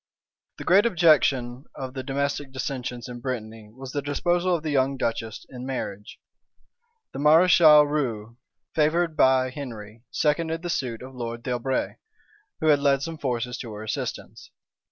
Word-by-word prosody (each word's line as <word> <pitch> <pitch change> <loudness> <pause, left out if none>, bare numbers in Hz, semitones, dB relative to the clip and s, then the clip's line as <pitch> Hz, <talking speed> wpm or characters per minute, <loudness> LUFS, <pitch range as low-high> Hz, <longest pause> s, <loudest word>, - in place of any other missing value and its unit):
The - - -7
great 200 +5 +5
object 165 -7 +5
of 130 +1 -7
the 130 - -4
domestic 140 +1 -2
dissensions 125 -2 -4
in 120 -1 -8
Brittany 115 -4 -6
was 130 +2 -9
the 145 - -2
disposal 175 +5 0
of 160 - -4
the 155 - -2
young 135 -1 +1
duchess 115 -3 -3
in 125 -1 -9
marriage. 105 -6 -5 0.9
The - - -6
mareschal 155 0 +7
Rieux, 120 -7 -3 0.4
favored 160 +2 +1
by 130 -2 +3
Henry, 115 -6 -8
seconded 160 +2 0
the 175 - -2
suit 125 -6 -3
of 130 - -9
the 130 - -13
lord 115 0 -5
D'Albret, 125 +1 -2 0.6
who 155 -2 +5
led 140 -1 +1
some 165 -1 -5
forces 125 -2 -2
to 115 - -7
her 105 +1 -7
assistance. 110 - -5
135 Hz, 155 wpm, -25 LUFS, 120-150 Hz, 0.9 s, mareschal